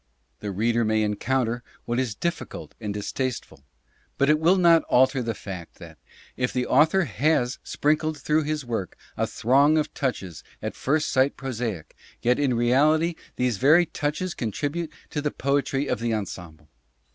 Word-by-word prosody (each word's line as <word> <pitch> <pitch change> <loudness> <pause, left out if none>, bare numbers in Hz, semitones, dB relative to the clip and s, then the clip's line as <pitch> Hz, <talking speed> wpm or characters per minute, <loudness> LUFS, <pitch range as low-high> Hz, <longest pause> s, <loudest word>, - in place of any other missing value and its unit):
The 105 - -5
reader 115 +4 +1
may 110 0 +2
encounter 120 +3 0 0.2
what 120 +1 -1
is 125 -6 -1
difficult 170 +7 -4
and 105 -2 -3
distasteful, 105 - -4 0.5
but 140 +2 +4
it 150 - +3
will 170 +4 +4
not 170 -2 +6
alter 130 +1 +3
the 115 -2 -3
fact 90 -5 -8
that, - - -13 0.4
if 125 0 -1
the 125 -1 -1
author 160 +10 +4
has 130 -1 0
sprinkled 155 +1 0
through 155 +2 +1
his 150 -2 -3
work 110 -7 -4 0.2
a - - 0
throng 140 +6 +3
of 155 - -1
touches 95 - -3 0.2
at - - -4
first 150 +3 0
sight 130 +2 +2
prosaic, 115 - -4 0.2
yet 125 +3 +2
in 135 -4 +2
reality 150 +8 +3 0.2
these 125 -4 0
very 155 - +5
touches 160 +3 -3
contribute 145 - -3 0.2
to 150 - -2
the 150 - 0
poetry 140 0 0
of - - -1
the 115 -1 0
ensemble. 85 -7 -7
130 Hz, 160 wpm, -25 LUFS, 115-150 Hz, 0.5 s, not